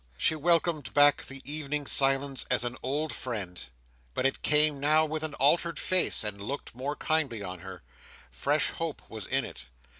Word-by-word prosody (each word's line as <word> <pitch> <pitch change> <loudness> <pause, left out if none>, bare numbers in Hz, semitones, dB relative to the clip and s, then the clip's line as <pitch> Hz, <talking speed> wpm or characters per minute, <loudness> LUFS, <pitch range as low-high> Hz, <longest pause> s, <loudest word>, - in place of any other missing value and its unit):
She - - +2
welcomed 160 -2 +1
back 145 0 +5
the 135 0 -9
evening 150 -1 -3
silence 135 0 +2
as 125 - +3
an 120 0 -4
old 145 +4 -2
friend, 100 -8 -5 0.5
but - - -1
it 135 - 0
came 150 -1 +3
now 155 +3 +3
with 155 0 -4
an 155 -1 -4
altered 170 +5 +3
face, 185 -9 +3
and 105 -1 -4
looked 135 +8 -6
more 135 +5 -4
kindly 145 -11 -1
on 90 -1 -6
her. 95 0 -10 0.5
Fresh - - 0
hope - - -5
was - - -4
in - - +1
it. 60 - -10
140 Hz, 175 wpm, -28 LUFS, 120-155 Hz, 0.5 s, back